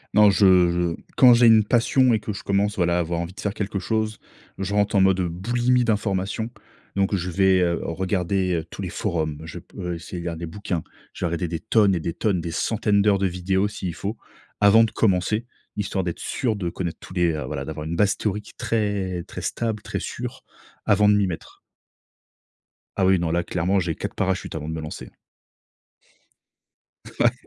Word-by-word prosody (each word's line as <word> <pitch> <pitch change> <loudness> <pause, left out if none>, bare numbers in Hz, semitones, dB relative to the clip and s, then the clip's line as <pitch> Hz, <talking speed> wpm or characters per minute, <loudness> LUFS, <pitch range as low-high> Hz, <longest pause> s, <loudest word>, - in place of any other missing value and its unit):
Non, 105 -1 +7
je 95 -3 +5
je 85 -1 0 0.2
quand 125 -2 +8
j'ai 120 0 +5
une 110 -1 +7
passion 120 +3 +3
et - - 0
que 105 0 -5
je 95 - -7
commence, 100 +1 0
voilà, 85 -1 +2
à - - +1
avoir 85 0 -1
envie 85 +2 -4
de - - -14
faire 100 - -2
quelque 105 -2 -3
chose, 110 +1 -1 0.4
je 95 +1 -3
rentre 105 0 +1
en 95 - +5
mode 95 -1 +4
boulimie 120 +8 +1
d'information. 105 0 -1 0.5
Donc 100 +1 +1
je 90 -1 -2
vais, 95 +1 +3
heu, 85 -1 +1
regarder, 95 +1 0
heu, 80 - -1
tous - - -7
les 95 - -3
forums, 80 -6 -2
je 80 - -7
peux 90 -2 -6
essayer 85 +1 -6
de 85 - -6
lire 85 -1 -3
des 85 0 -5
bouquins, 90 -1 -4 0.3
je - - -3
vais - - +2
regarder 85 +1 -2
des 85 -1 -4
tonnes 105 -3 +3
et 85 - 0
des 85 +1 -3
tonnes, 90 0 0
des 85 - -4
centaines 105 +2 +1
d'heures 100 -2 +3
de 95 - +2
vidéos 95 +2 0
s'il 100 -4 -5
faut, 100 +5 -4 0.4
avant 105 +2 +7
de 115 - +1
commencer, 105 +2 +1 0.3
histoire 100 -2 -1
d'être 85 -2 -4
sûr 115 -4 -1
de 90 -4 -3
connaître 85 -3 -4
tous - - -11
les 90 -2 +2
heu 75 - -3
voilà, 70 -3 -4
d'avoir 75 +2 -6
une 85 +2 -3
base 105 +1 +2
théorique 105 0 -3
très 105 -6 -1
très - - -7
stable, 110 -3 -2
très - - -3
sûre, - - -6 0.4
avant 105 +1 +4
de 105 - +6
m'y 100 -1 +3
mettre. 85 -3 -7 1.4
Ah 95 - +2
oui, 95 0 +5
non, 85 -1 -1
là 85 +1 +1
clairement, 90 +3 0
j'ai 85 -3 -2
4 - - -5
parachutes 95 -1 -1
avant 75 -1 -5
de 80 - -3
me 80 - -4
lancer. 75 - -7 2.1
Ouais. - - +4
95 Hz, 205 wpm, -23 LUFS, 85-105 Hz, 2.1 s, quand